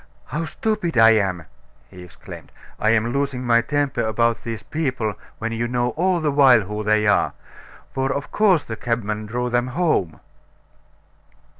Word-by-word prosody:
"How 165 Hz, +2 st, -3 dB
stupid 180 Hz, -, -2 dB
I 115 Hz, 0 st, +7 dB
am!" 95 Hz, -6 st, 0 dB, 0.5 s
he 90 Hz, -2 st, -12 dB
exclaimed. 90 Hz, -, -12 dB, 0.3 s
"I'm 110 Hz, +2 st, +2 dB
losing 140 Hz, -2 st, -2 dB
my 115 Hz, -1 st, +4 dB
temper 145 Hz, +3 st, -1 dB
about 115 Hz, +1 st, 0 dB
these 115 Hz, -1 st, -5 dB
people 130 Hz, -9 st, -2 dB, 0.2 s
when 115 Hz, 0 st, -4 dB
you 115 Hz, +1 st, -2 dB
know 120 Hz, 0 st, 0 dB
all 180 Hz, +4 st, 0 dB
the 155 Hz, -2 st, 0 dB
while 135 Hz, -5 st, +6 dB
who 105 Hz, +2 st, -5 dB
they 105 Hz, 0 st, +2 dB
are. 105 Hz, -, +2 dB, 0.6 s
For 135 Hz, 0 st, -1 dB
of 140 Hz, -, -4 dB
course 195 Hz, -7 st, +3 dB
the 110 Hz, -, -6 dB
cabmen 110 Hz, -2 st, -3 dB
drove 125 Hz, +2 st, -2 dB
them 120 Hz, +1 st, +1 dB
home." 130 Hz, -, 0 dB
120 Hz, 155 wpm, -22 LUFS, 110-140 Hz, 0.6 s, I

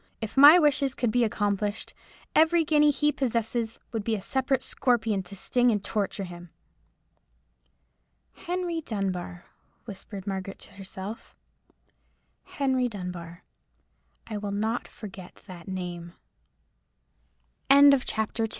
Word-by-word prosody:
If 220 Hz, -2 st, -6 dB
my 290 Hz, +5 st, +10 dB
wishes 285 Hz, -4 st, +2 dB
could 240 Hz, -3 st, 0 dB
be 245 Hz, +2 st, +2 dB
accomplished, 205 Hz, -1 st, -1 dB, 0.4 s
every 325 Hz, +1 st, +4 dB
guinea 300 Hz, -1 st, +4 dB
he 295 Hz, +1 st, +2 dB
possesses 230 Hz, -3 st, -1 dB
would 225 Hz, -3 st, -3 dB
be 225 Hz, +1 st, 0 dB
a 205 Hz, -, -5 dB
separate 265 Hz, +4 st, 0 dB
scorpion 230 Hz, -6 st, 0 dB
to 185 Hz, +2 st, -10 dB
sting 245 Hz, +5 st, +2 dB
and 210 Hz, -3 st, 0 dB
to -, -, -3 dB
torture 205 Hz, -2 st, -1 dB
him." 175 Hz, -1 st, -9 dB, 1.8 s
"Henry 350 Hz, -2 st, -3 dB
Dunbar," 185 Hz, -, -4 dB, 0.4 s
whispered 195 Hz, -2 st, -9 dB
Margaret 195 Hz, -1 st, -4 dB
to -, -, -13 dB
herself—"Henry 225 Hz, +6 st, -6 dB
Dunbar. 180 Hz, -4 st, -7 dB, 0.8 s
I 215 Hz, -2 st, -5 dB
will 205 Hz, 0 st, -4 dB
not 220 Hz, +4 st, -2 dB
forget 190 Hz, -4 st, -11 dB
that 180 Hz, -4 st, -11 dB
name." 175 Hz, -2 st, -6 dB, 1.6 s
CHAPTER 270 Hz, -6 st, +4 dB
III. -, -, -5 dB
220 Hz, 115 wpm, -27 LUFS, 195-265 Hz, 1.8 s, my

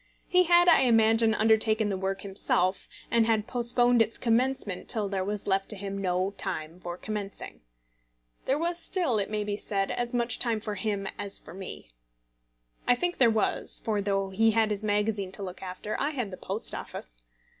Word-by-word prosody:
He 365 Hz, 0 st, +4 dB
had, 345 Hz, +1 st, +5 dB
I 340 Hz, -, +7 dB
imagine, 225 Hz, -2 st, +4 dB
undertaken 220 Hz, 0 st, +3 dB
the 195 Hz, -, -1 dB
work 190 Hz, 0 st, -3 dB
himself, 190 Hz, -1 st, 0 dB, 0.2 s
and 230 Hz, -1 st, +3 dB
had 220 Hz, -2 st, +1 dB
postponed 245 Hz, 0 st, +3 dB
its 225 Hz, 0 st, +2 dB
commencement 235 Hz, -4 st, 0 dB
till 215 Hz, -4 st, +2 dB
there 195 Hz, -1 st, -2 dB
was 205 Hz, +1 st, -3 dB
left 195 Hz, 0 st, 0 dB
to 215 Hz, -, -2 dB
him 195 Hz, 0 st, -5 dB
no 185 Hz, 0 st, -1 dB
time 155 Hz, +3 st, -4 dB
for 175 Hz, -1 st, -6 dB
commencing. 205 Hz, -1 st, -6 dB, 0.8 s
There 270 Hz, -, +2 dB
was 340 Hz, +2 st, -1 dB
still, 330 Hz, -, 0 dB
it 200 Hz, -, -2 dB
may 210 Hz, -1 st, -2 dB
be 205 Hz, 0 st, -3 dB
said, 195 Hz, -2 st, -1 dB
as 240 Hz, 0 st, -2 dB
much 240 Hz, -1 st, +1 dB
time 230 Hz, -3 st, +1 dB
for 210 Hz, 0 st, -5 dB
him 205 Hz, -1 st, -2 dB
as 200 Hz, -1 st, -1 dB
for -, -, -9 dB
me. 185 Hz, -, -8 dB, 1.0 s
I 245 Hz, -, +5 dB
think 350 Hz, +7 st, -2 dB
there 240 Hz, -3 st, +6 dB
was, 220 Hz, -2 st, +1 dB
for 210 Hz, -2 st, 0 dB
though 195 Hz, -1 st, -1 dB
he 225 Hz, +4 st, +3 dB
had 220 Hz, -1 st, +2 dB
his 210 Hz, 0 st, -2 dB
magazine 205 Hz, -2 st, 0 dB
to 200 Hz, -, -5 dB
look 185 Hz, -1 st, -7 dB
after, 190 Hz, +3 st, -5 dB
I 285 Hz, -, +1 dB
had 250 Hz, -9 st, -4 dB
the -, -, -6 dB
Post 200 Hz, +4 st, -3 dB
Office. -, -, -7 dB
215 Hz, 190 wpm, -28 LUFS, 195-235 Hz, 1.0 s, I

